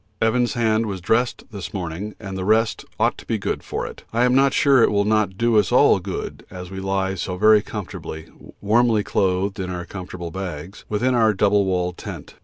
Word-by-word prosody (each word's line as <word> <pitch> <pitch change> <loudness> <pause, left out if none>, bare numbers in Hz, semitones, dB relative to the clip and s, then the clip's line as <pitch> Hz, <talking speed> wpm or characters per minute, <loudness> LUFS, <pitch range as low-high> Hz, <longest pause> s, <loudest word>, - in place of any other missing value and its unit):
Evans' 120 +2 +1
hand 110 -1 +1
was 95 -2 -4
dressed 115 +7 0
this 95 -3 -7
morning, 95 +3 -5
and 95 -3 -7
the 95 - -3
rest 110 +2 +2 0.2
ought - - +1
to - - -12
be - - 0
good - - -3
for - - -4
it. - - -9
I 115 +2 +2
am 125 0 +3
not 135 +1 +4
sure 140 -4 +4
it - - +5
will 100 -1 +1
not 105 -3 +1
do 115 -1 +3
us 95 -4 0
all - - +5
good - - -6
as 90 -1 -9
we 95 - -6
lie 95 0 -1
so 90 0 -4
very 110 +2 +6
comfortably, 90 -6 -7 0.4
warmly 110 +1 +3
clothed 95 -1 0
in 95 -1 -3
our 90 -1 -5
comfortable 90 -3 -7
bags, 90 -1 -7
within 120 +5 +1
our 110 -3 +3
double 100 +1 +3
walled 90 -1 -1
tent. - - -8
100 Hz, 205 wpm, -22 LUFS, 95-110 Hz, 0.4 s, very